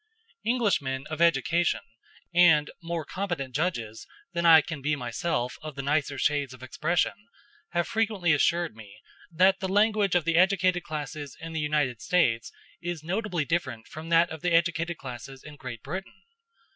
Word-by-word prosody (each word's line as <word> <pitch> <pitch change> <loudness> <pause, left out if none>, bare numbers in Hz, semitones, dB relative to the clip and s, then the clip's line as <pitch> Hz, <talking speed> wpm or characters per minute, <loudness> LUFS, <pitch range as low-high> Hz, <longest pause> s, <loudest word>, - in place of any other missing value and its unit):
Englishmen 195 - 0
of 155 +1 -3
education, 170 +1 +2 0.5
and 160 -4 +5
more 170 -2 -3
competent 175 -9 -4
judges 120 -8 -2 0.3
than 170 0 +1
I 160 -1 +9
can 150 0 -6
be 150 +2 +1
myself 125 0 -2
of 155 -2 -7
the 140 - -4
nicer 145 -1 0
shades 140 -2 0
of 130 - -15
expression, 155 +7 0 0.6
have 175 0 +1
frequently 210 -7 +1
assured 170 -1 +1
me 105 -2 -13 0.3
that 185 +3 +4
the 190 - -2
language 205 -1 +3
of 175 -3 +2
the 165 -1 +2
educated 185 -1 +3
classes 150 -3 -6
in 165 0 -7
the 160 - -2
United 150 -6 0
States 125 -9 +1 0.3
is 175 -3 -4
notably 180 -2 -1
different 140 -9 -2
from 160 +1 -9
that 170 +1 +4
of 160 -1 -7
the 180 -1 0
educated 170 0 +1
classes 130 +1 -9
in 150 0 -10
Great 130 -5 -8
Britain. 190 +1 -7
160 Hz, 160 wpm, -27 LUFS, 140-175 Hz, 0.6 s, I